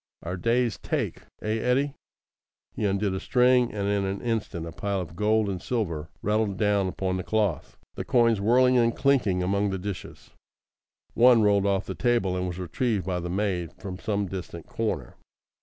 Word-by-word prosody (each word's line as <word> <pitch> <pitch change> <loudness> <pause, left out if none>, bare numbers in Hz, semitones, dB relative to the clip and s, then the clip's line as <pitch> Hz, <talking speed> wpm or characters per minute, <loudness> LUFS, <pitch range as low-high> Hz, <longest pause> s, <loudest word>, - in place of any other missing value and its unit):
"Our 90 +2 -3
day's 115 +4 0
take. - - -2 0.2
Eh, 110 +1 0
Hetty?" 135 +4 +1 0.8
He - - -2
undid 100 0 0
a 95 - -2
string, 125 0 +3
and 100 -1 -2
in 100 -1 +1
an 95 +1 -2
instant 110 -8 -2
a 85 - -6
pile 100 +2 -2
of 85 -3 -6
gold 105 +2 +2
and 95 -3 -3
silver 85 -10 -2
rattled 105 -2 0
down 100 -1 +2
upon 95 0 -2
the 90 - -3
cloth, 105 -6 -1 0.2
the - - -5
coins 115 -4 +3
whirling 125 +4 +4
and 115 0 +2
clinking 125 -10 +2
among 100 +2 +1
the 95 - -2
dishes. 95 0 -7 0.8
One 120 -2 +6
rolled 100 -1 +3
off 100 0 +1
the - - -4
table 120 -7 +1
and 90 0 -1
was 90 -1 -5
retrieved 100 +4 -1
by 90 -1 -1
the 90 0 -5
maid 90 -3 -1
from 95 -1 -7
some 100 -1 -1
distant 90 -3 -7
corner. 90 - -3
100 Hz, 180 wpm, -26 LUFS, 95-115 Hz, 0.8 s, One